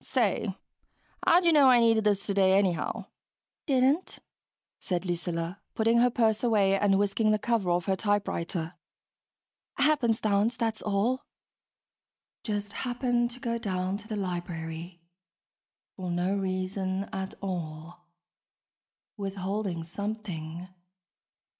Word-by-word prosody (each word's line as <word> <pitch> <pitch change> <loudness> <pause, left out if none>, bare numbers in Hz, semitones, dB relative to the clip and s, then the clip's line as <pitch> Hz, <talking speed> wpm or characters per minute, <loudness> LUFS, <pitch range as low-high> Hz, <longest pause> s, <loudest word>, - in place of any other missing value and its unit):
"Say, 215 -5 0 0.7
how'd 345 +1 +6
you 335 - +5
know 285 -3 +7
I 250 -1 +7
needed 225 -2 +4
this 200 -2 +2
today, 195 -1 +4
anyhow?" 185 -4 0 0.6
"Didn't," 275 +5 +2 0.6
said 180 -1 -2
Lucilla, 175 +1 -3
putting 230 +1 +3
her 245 +1 +5
purse 225 -2 +1
away 205 -5 +3
and 195 0 +3
whisking 205 +2 +2
the 215 - +4
cover 220 -4 0
off 175 -1 +1
her 190 - +1
typewriter. 185 -5 -1 1.0
"Happenstance, 230 -7 +2
that's 225 -2 -1
all." 215 +6 0 1.2
(Just 205 -1 -3
happened 245 -1 0
to 245 +1 -10
go 235 -2 -2
down 185 -3 -2
to 210 - -11
the 220 - -3
library... 175 -2 -5 0.9
for 185 -2 -4
no 175 +3 0
reason 190 0 -2
at 190 0 -4
all... 175 -2 -6 1.1
withholding 195 -2 -3
something 180 -3 -5
200 Hz, 115 wpm, -28 LUFS, 185-225 Hz, 1.2 s, know